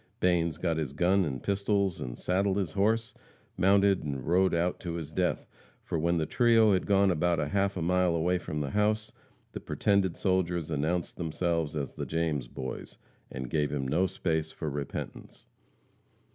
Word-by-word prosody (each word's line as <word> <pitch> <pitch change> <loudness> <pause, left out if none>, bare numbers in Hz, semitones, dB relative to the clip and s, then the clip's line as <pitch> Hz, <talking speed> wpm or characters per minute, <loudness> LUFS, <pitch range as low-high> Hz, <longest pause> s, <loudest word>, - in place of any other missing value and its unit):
Banes 85 -2 +2
got 85 -3 -1
his 75 -4 -3
gun 90 +5 +3
and 65 -4 -4
pistols 100 -2 0
and - - -5
saddled 95 +2 0
his 95 -6 -1
horse, 110 +5 +1 0.4
mounted 100 0 +3
and 70 -4 -4
rode 90 +2 +3
out 85 +2 0
to 85 -2 -5
his 80 -3 -6
death, 90 +1 -1 0.4
for 80 - -2
when 85 +2 +1
the 80 - 0
trio 115 +2 +4
had 95 - 0
gone 100 -1 +4
about 85 +1 +1
half 100 -1 +1
a 85 - -2
mile 90 0 +2
away 90 +2 +1
from 75 -3 -4
the 70 - -3
house, 105 +1 +1 0.4
the - - -6
pretended 100 -3 +1
soldiers 90 -4 0
announced 80 +4 -1
themselves 85 -2 -1
as 70 -4 -3
the - - -5
James 80 -6 -1
boys, 65 +1 -7 0.3
and 65 -1 -6
gave 75 -2 +1
him 70 -3 -2
no 90 +8 +2
space 80 -3 -2
for 80 -3 -4
repentance. 70 0 -6
85 Hz, 175 wpm, -29 LUFS, 80-95 Hz, 0.4 s, trio